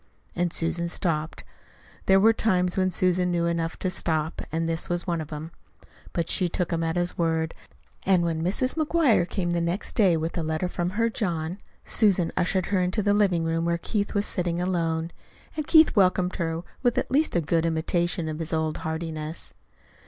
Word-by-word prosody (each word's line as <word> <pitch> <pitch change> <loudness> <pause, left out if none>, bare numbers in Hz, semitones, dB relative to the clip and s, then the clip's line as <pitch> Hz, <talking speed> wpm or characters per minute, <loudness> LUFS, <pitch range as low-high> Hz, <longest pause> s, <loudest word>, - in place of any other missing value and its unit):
And 175 -1 0
Susan 170 +1 0
stopped. 165 -2 -2 0.6
There 190 0 +6
were 225 +3 +5
times 180 -5 +1
when 185 -1 +2
Susan 180 0 +1
knew 170 -1 0
enough 170 -1 -1
to 185 - -2
stop, 160 -3 -1
and 165 +1 -1
this 165 0 -2
was 175 0 0
one 170 -3 -1
of 155 - -6
them. 155 +2 -7 0.6
But 170 -2 -2
she 180 -3 +1
took 175 0 -2
him 165 0 0
at 165 +1 -1
his 175 0 -1
word, 160 -1 0 0.5
and 185 -2 +3
when 165 -2 -1
Mrs. 205 +9 0
McGuire 290 - +2
came 175 -3 -1
the 170 0 0
next 170 +4 -2
day 185 -6 +4
with 160 +1 -3
a - - 0
letter 160 +3 -1
from 175 -1 -2
her 230 0 +2
John, 175 -4 -2 0.3
Susan 195 -6 +2
ushered 185 0 +1
her 185 - +3
into 180 +4 0
the 205 0 +3
living 195 -5 +2
room 165 0 0
where 170 0 +1
Keith 205 +4 -2
was 205 0 +1
sitting 175 -2 -1
alone. 165 -2 -1 0.4
And 305 -1 -3
Keith 320 -4 +6
welcomed 185 -2 +2
her 165 -1 -2 0.2
with 245 -2 +1
at - - -1
least 295 -2 +2
a - - +4
good 165 +1 +1
imitation 170 +1 0
of 155 0 -4
his 165 -1 -3
old 160 -1 0
heartiness. 160 -1 -4
175 Hz, 195 wpm, -26 LUFS, 165-185 Hz, 0.6 s, There